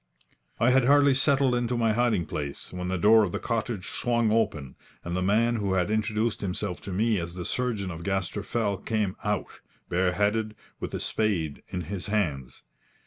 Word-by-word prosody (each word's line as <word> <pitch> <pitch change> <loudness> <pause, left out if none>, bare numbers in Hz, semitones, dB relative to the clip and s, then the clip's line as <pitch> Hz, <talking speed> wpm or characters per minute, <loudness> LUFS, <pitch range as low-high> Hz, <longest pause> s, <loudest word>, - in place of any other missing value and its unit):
I 120 +3 +4
had 130 -1 +4
hardly 140 +1 +5
settled 135 -1 +3
into 120 0 0
my 115 -2 +2
hiding 115 -7 +1
place, 75 0 -5
when 90 0 -4
the 95 0 -1
door 110 +5 +6
of 100 -5 0
the - - -2
cottage 115 -4 -3
swung 120 -2 +1
open, 100 - 0 0.3
and 85 0 -3
the 90 - 0
man 115 +5 +2
who 100 -3 -1
had 95 +2 +1
introduced 110 +1 0
himself 95 -1 -3
to 100 - -7
me 105 +2 +1
as 85 +1 -5
the 90 -1 -5
surgeon 110 -7 -1
of 85 -1 -7
Gaster 95 +2 -2
Fell 100 -1 -1
came 105 -3 -1
out, 105 -2 -2 0.3
bareheaded, 105 +5 +1 0.2
with - - -4
a - - -2
spade 90 -9 -1
in 90 - -4
his 90 +4 -5
hands. 80 - -2
105 Hz, 185 wpm, -27 LUFS, 90-115 Hz, 0.3 s, door